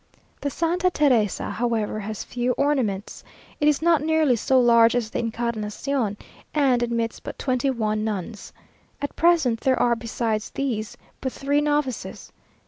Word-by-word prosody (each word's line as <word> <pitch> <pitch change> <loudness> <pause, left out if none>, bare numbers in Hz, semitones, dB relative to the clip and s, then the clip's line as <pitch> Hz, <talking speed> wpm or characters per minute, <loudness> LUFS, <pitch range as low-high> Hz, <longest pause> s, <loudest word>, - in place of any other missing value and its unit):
The 285 - -1
Santa 345 +5 +1
Teresa, 255 - +1
however, 225 -3 -1
has 215 0 -5
few 245 0 -1
ornaments. 245 -9 -1 0.4
It 295 - +2
is 300 +1 +2
not 335 -3 +4
nearly 310 -4 +3
so 260 +3 +2
large 235 -1 +5
as 230 -3 -1
the - - -1
Encarnación, 230 0 -2 0.4
and 265 -5 +3
admits 235 -1 -1
but - - -8
twenty 255 0 0
one 215 -4 -1
nuns. 210 0 -4 0.5
At 285 - -4
present 320 -9 +3
there 260 +1 +1
are, 240 -1 +3
besides 225 -1 -2
these, 240 -4 -3 0.2
but 260 - -2
three 285 +3 0
novices. 295 -4 -2
245 Hz, 145 wpm, -24 LUFS, 225-285 Hz, 0.5 s, large